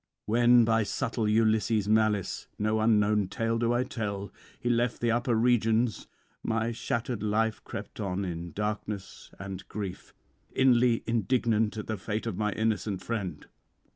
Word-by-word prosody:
When 120 +2 +5
by 115 0 +3
subtle 110 +2 -1
Ulysses' 110 -1 +2
malice 110 -2 +1
(no 110 +1 +1
unknown 105 -2 +3
tale 115 +4 -1
do 120 0 +1
I 120 +1 +2
tell) 105 -7 -4 0.3
[91 120 - +2
124]he - - +3
left 120 +1 0
the 120 -1 +1
upper 120 +1 +1
regions, 115 -1 +2 0.3
my 110 +1 0
shattered 115 0 -3
life 110 +1 0
crept - - -8
on 100 -1 -2
in 85 -1 -5
darkness 105 0 -4
and 95 -1 -6
grief, 100 -3 -6 0.4
inly 125 -2 +4
indignant 115 -1 +1
at 105 - -4
the 110 - -3
fate 105 +3 -3
of 115 -5 -2
my 105 +2 0
innocent 110 -3 -1
friend. 105 -6 -4
110 Hz, 150 wpm, -29 LUFS, 105-115 Hz, 0.4 s, When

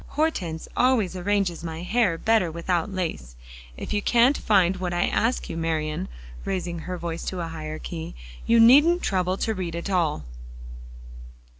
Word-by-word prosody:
"Hortense 185 - -1
always 235 -8 +2
arranges 185 -2 0
my 165 0 -5
hair 195 -3 +1
better 220 -3 +2
without 170 +3 -1
lace. 160 - -4 0.4
If - - -5
you 205 - +1
can't 240 +6 +4
find 190 -3 +3
what 180 -1 -3
I 175 - +2
ask 235 +3 0
you, - - -5
Marian," 155 - -2 0.4
raising 175 -3 -3
her 180 +3 -5
voice 170 -1 -4
to 185 - -3
a 165 -1 -3
higher 155 -1 -6
key, 160 0 -7 0.3
"you 230 0 +5
needn't 295 +10 +6
trouble 185 -1 0
to 220 - -1
read 180 -4 -4
at 170 +4 -4
all." 165 - 0
180 Hz, 160 wpm, -25 LUFS, 165-210 Hz, 0.4 s, needn't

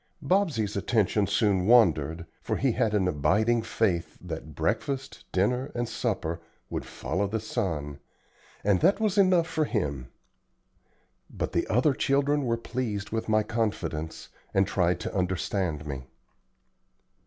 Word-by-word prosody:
Bobsey's 150 - +1
attention 105 -1 +1
soon 100 -2 +2
wandered, 85 - +4 0.2
for - - -2
he 135 -1 +2
had 110 -1 +1
an 95 -3 +2
abiding 105 +9 +2
faith 100 -6 -1
that 80 -2 -7
breakfast, 135 -1 -2
dinner, 125 +9 +1
and 120 0 -1
supper 90 -9 -2 0.3
would - - -3
follow 95 +5 -2
the 110 +3 -2
sun, 80 - -3 0.6
and 100 -2 +3
that 195 +4 +4
was 210 -2 +1
enough 185 -3 +5
for 160 -1 0
him. 70 - -2 1.2
But - - -3
the - - 0
other 130 +5 +3
children 140 +1 +1
were 115 -1 +1
pleased 115 -4 -3
with 115 0 -2
my 110 0 +3
confidence, 100 -8 -3 0.3
and 95 0 +5
tried 90 -2 +1
to 115 - -4
understand 90 -3 -1
me. 70 -3 -5
105 Hz, 135 wpm, -27 LUFS, 90-125 Hz, 1.2 s, enough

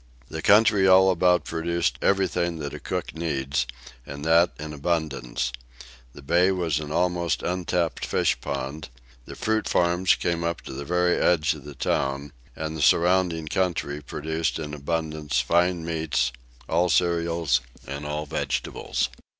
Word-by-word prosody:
The 80 - -5
country 105 0 +5
all 95 0 +7
about 90 0 +3
produced 85 +1 -1
everything 90 -3 +1
that 70 -2 -5
a - - -6
cook - - -4
needs, 70 -5 -1 0.4
and 70 +3 -8
that 85 +2 +5
in 75 0 -6
abundance 75 -6 -2 0.6
the 75 - -12
bay 85 +6 +3
was 85 -5 0
an 75 -1 -6
almost 85 0 0
untapped 90 -1 -1
fish - - +1
pond, 70 +4 -4 0.4
the - - -9
fruit 110 0 -1
farms 90 +1 +3
came 85 -1 -1
up 85 0 -2
to - - -9
the 70 +2 -6
very 90 +2 +2
edge 80 -4 +3
of - - -12
the 75 -1 -9
town, 70 +2 -1 0.2
and 80 0 -4
the 80 - -4
surrounding 85 0 +3
country 80 -4 -1
produced 80 +3 -2
in 75 -2 -5
abundance 75 -2 -2
fine 85 +5 +1
meats, 80 -5 0 0.4
all 85 +2 +2
cereals 85 -6 +2 0.2
and 70 +2 -6
all 75 +1 -3
vegetables. 75 -4 -2
80 Hz, 150 wpm, -25 LUFS, 75-90 Hz, 0.6 s, all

